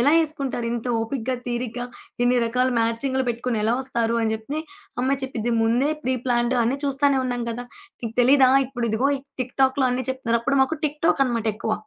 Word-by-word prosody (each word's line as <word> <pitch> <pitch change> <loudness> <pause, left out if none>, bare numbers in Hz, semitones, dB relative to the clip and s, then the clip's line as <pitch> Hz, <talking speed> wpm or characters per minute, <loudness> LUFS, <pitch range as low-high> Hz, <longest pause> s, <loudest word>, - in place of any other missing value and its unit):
"ఎలా 280 +5 +4
ఏసుకుంటారింత 255 -6 -3
ఓపికగా, 250 +2 -2
తీరిగ్గా 245 0 -3 0.4
ఇన్ని 245 +1 +3
రకాల 250 +2 +1
మ్యాచింగులు 260 +4 0
పెట్టుకొని 235 -1 -1
ఎలా 225 +2 +2
ఒస్తారు?" 235 -3 0
అని 220 -1 +1
జెప్తే 250 +8 -4 0.4
ఆ - - -9
అమ్మాయి 270 +1 0
చెప్పిద్ది, 240 -3 -2
"ముందే 240 +6 +2
ప్రీ 260 +1 +1
ప్లాన్డ్ 240 0 +2
అన్ని 260 +5 0
చూస్తూనే 280 0 +2
ఉన్నాం 245 -1 -2
కదా! 240 +2 -5 0.4
నీకు 230 -2 -5
తెలీదా 260 +1 +6 0.2
ఇప్పుడు 245 -2 -3
ఇదిగో 230 +6 +1 0.3
టిక్ 255 0 -4
టాక్‌లో 265 0 +3
అన్నీ 255 +1 -1
చెప్తున్నారు" 235 -3 0
అప్పుడు 275 +3 +1
మాకు 295 +5 0
టిక్ 300 0 -2
టాక్‌ 275 - +4
అనమాట 230 -3 -1
ఎక్కువ. 220 +1 -2
250 Hz, 180 wpm, -23 LUFS, 235-265 Hz, 0.4 s, తెలీదా